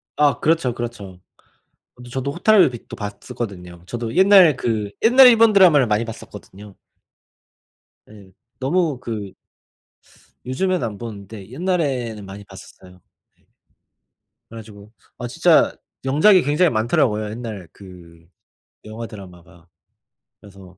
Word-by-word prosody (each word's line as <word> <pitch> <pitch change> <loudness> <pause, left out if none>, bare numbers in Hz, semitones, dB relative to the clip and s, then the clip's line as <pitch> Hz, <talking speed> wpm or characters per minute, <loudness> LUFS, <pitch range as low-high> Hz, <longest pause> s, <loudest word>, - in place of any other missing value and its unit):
아 145 -1 +2
그렇죠, 155 -6 +1
그렇죠. 105 -6 -7 0.8
어 125 - -15
저도 135 +2 -4
호타루의 190 -2 +4
빛도 120 - -10
봤었거든요. 100 -4 -8
저도 115 0 -5
옛날 190 -6 +6
그 110 -5 -3
옛날 255 +4 +7
일본 230 -2 +6
드라마를 170 -10 +5
많이 105 +2 0
봤었거든요. 105 -2 -12 1.4
예. 100 -3 -16 0.3
너무 150 0 -1
그 105 -6 -6 1.1
요즘에는 180 +8 -1
안 105 -3 -6
보는데 100 -2 -10
옛날에는 130 - -3
많이 100 +1 -10
봤었어요. 95 -1 -15 0.4
네. - - -36 1.0
그래 115 - -11
가지고 105 -1 -14 0.3
아 - - -5
진짜 - - +2 0.3
명작이 155 +8 +4
굉장히 150 +5 +2
많더라고요, 110 -1 0
옛날 110 -6 -8
그 85 -4 -16 0.6
영화 110 +2 -8
드라마가. 90 -4 -14 0.7
그래서 95 -3 -16
115 Hz, 275 characters per minute, -20 LUFS, 100-145 Hz, 1.4 s, 옛날